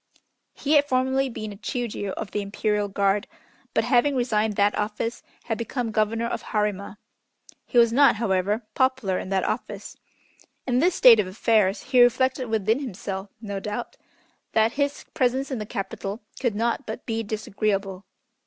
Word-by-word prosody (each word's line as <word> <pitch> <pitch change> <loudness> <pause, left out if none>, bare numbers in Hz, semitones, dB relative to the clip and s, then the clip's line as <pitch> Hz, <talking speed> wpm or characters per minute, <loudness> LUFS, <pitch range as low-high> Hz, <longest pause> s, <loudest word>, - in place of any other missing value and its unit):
He 290 - -3
had 290 -1 +6
formerly 265 +1 +1
been 215 -3 -6
a - - -11
Chiûjiô 220 -1 -4
of 215 - -6
the 210 - -1
Imperial 205 +1 -1
Guard, 200 +1 +1 0.5
but - - +3
having 270 +2 +3
resigned 220 -4 +1
that 205 +1 +3
office, 225 +2 -2 0.2
had 225 -2 -3
become 235 0 -3
Governor 220 +2 0
of 235 - -3
Harima. 210 -2 -2 0.7
He 245 - -2
was 235 -1 +6
not, 280 -1 +6
however, 205 0 0
popular 260 -8 +1
in - - -6
that 195 -1 +1
office. - - -4 0.7
In 250 -1 +1
this 350 +5 +3
state 240 -8 +8
of 200 - +1
affairs 205 0 +2
he 250 -2 +4
reflected 255 +1 +3
within 220 +2 +1
himself, 195 -6 -5
no 200 -3 -4
doubt, 210 +4 -5 0.6
that 220 +1 +3
his 285 +1 -2
presence 265 +2 0
in 255 - -2
the 210 - -5
Capital 200 +2 -5 0.2
could 240 -5 0
not 230 +2 -1
but 220 +3 -6
be 225 -1 -1
disagreeable. 205 -2 -2
220 Hz, 160 wpm, -25 LUFS, 205-250 Hz, 0.7 s, state